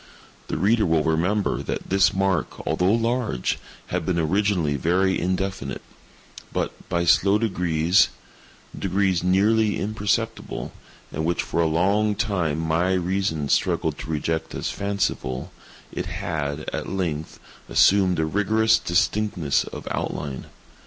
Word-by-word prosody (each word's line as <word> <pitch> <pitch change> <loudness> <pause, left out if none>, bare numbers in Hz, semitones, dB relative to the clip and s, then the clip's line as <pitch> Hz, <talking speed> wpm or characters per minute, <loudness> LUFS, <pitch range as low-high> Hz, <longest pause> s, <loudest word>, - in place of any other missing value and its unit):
The - - -2
reader 105 +6 +3
will 80 -2 +2
remember 90 +6 +1
that - - -5
this 95 0 +4
mark, 95 -4 -1
although 90 +2 +2
large, 115 - 0 0.3
had 90 -2 0
been 85 +1 -1
originally 85 -2 +1
very 90 +6 +1
indefinite; 95 -5 -2 0.7
but, - - -1 0.2
by 85 0 0
slow 100 +4 +4
degrees—degrees 90 0 0
nearly 105 +4 +3
imperceptible, 110 +2 -2 0.4
and 80 - -2
which 85 +1 0
for 85 - -1
a 80 - +3
long 100 +6 +2
time 95 -9 0
my 80 +3 +1
reason 90 -4 0
struggled - - +1
to - - -7
reject 80 +1 -2
as - - -2
fanciful—it 100 -10 -4
had, 75 -3 -3
at - - -3
length, 80 -5 -3 0.3
assumed 95 -3 +4
a 80 - +1
rigorous 110 +6 +2
distinctness 90 -3 +1
of - - -8
outline. 70 -3 -4
90 Hz, 120 wpm, -24 LUFS, 80-100 Hz, 0.7 s, this